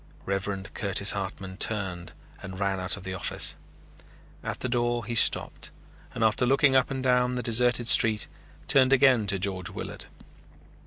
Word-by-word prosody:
Reverend 95 0 -4
Curtis - - +1
Hartman 95 -1 -6
turned 95 -5 -1 0.3
and 95 -2 -8
ran 100 -1 -1
out 95 +2 0
of 100 - -11
the 95 0 -5
office. 95 - -2 0.9
At - - -5
the - - -2
door 120 -1 -1
he 120 - -4
stopped, 115 - +2 0.5
and 115 - -1
after 110 +3 +2
looking 135 +1 +3
up 130 -1 +3
and 135 -2 -4
down 125 -1 +2
the 125 - -3
deserted 120 +1 +1
street, 110 -2 +4 0.4
turned 135 -1 +4
again 130 -5 +4
to 100 0 0
George 95 -1 -3
Willard. - - -8
110 Hz, 160 wpm, -26 LUFS, 95-125 Hz, 0.9 s, street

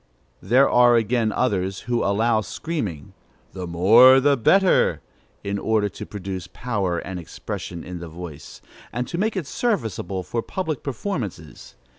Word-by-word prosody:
There 125 +8 +4
are 120 -1 +5
again 115 0 +1
others 95 -5 -1
who 120 -1 -1
allow 110 +3 +2
screaming, 105 - -5 0.4
"the 90 -2 -6
more 115 +10 +7
the 140 +1 +3
better," 185 - +3 0.4
in 100 0 -2
order 110 -1 +1
to - - -8
produce 95 -3 -6
power 100 -8 -2
and 90 +1 -5
expression 85 0 -7
in 90 -1 -7
the 85 -1 -8
voice, 80 -3 -10 0.3
and 125 +1 -3
to 170 - -4
make 215 0 0
it 180 - -2
serviceable 110 - -2
for 115 +5 -3
public 160 -3 -4
performances. 120 - -6
110 Hz, 145 wpm, -23 LUFS, 90-130 Hz, 0.4 s, more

